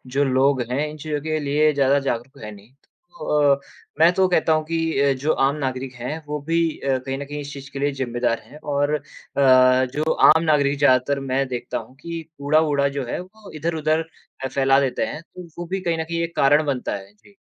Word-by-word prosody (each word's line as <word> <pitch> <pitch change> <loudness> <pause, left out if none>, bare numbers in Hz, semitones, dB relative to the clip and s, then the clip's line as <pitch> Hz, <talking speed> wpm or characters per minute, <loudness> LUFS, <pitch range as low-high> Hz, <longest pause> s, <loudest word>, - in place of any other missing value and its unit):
जो 145 - +3
लोग 135 0 +2
हैं, 145 +4 0
इन 155 - -9
चीज़ों 150 0 -3
के 155 +1 -2
लिए 150 +1 +2
ज़्यादा 140 0 +3
जागरूक 130 -1 -3
तो 140 - -17
हैं 105 - -7
नहीं। 105 +3 -15
तो 150 - -1
अ, - - -14 0.4
मैं 165 +2 +7
तो 190 +1 +3
कहता 165 -3 +2
हूँ 155 0 +1
कि 165 -2 -1
अ, 140 0 +4
जो 140 +4 -1
आम 135 +2 +1
नागरिक 130 -2 -4
हैं, 125 +7 -5
वो 150 0 -3
भी 165 0 +2 0.2
अ, 135 -1 0
कहीं 135 +1 -5
न 140 - -5
कहीं 145 +1 -6
इस 145 +1 -8
चीज़ 140 -1 -9
के 140 - -6
लिए 145 +1 +1
जिम्मेदार 120 -3 -1
हैं 145 - -14
और 145 +1 0
अ, 150 - -4 0.4
जो 130 +3 +4
आम 160 +2 +5
नागरिक 145 -2 +2
ज़्यादातर 140 0 +3
मैं 135 0 -1
देखता 125 -1 -4
हूँ 115 +3 -9
कि 170 -1 -5 0.2
कूड़ा-वूड़ा 145 -1 +2
जो 140 - -1
है, - - -4
वो 200 +3 -12
इधर-उधर 160 0 0 0.4
अ, - - 0
फैला 135 +1 +3
देते 135 -2 0
हैं, 150 - -6
तो 175 +1 -12
वो 175 - -5
भी 195 0 -1
कहीं 170 -2 -1
न - - -1
कहीं 170 +1 -3
एक 170 0 -5
कारण 145 +3 +4
बनता 135 -3 -2
है। 100 0 -10
जी। 105 -1 -23
140 Hz, 225 wpm, -22 LUFS, 130-155 Hz, 0.4 s, मैं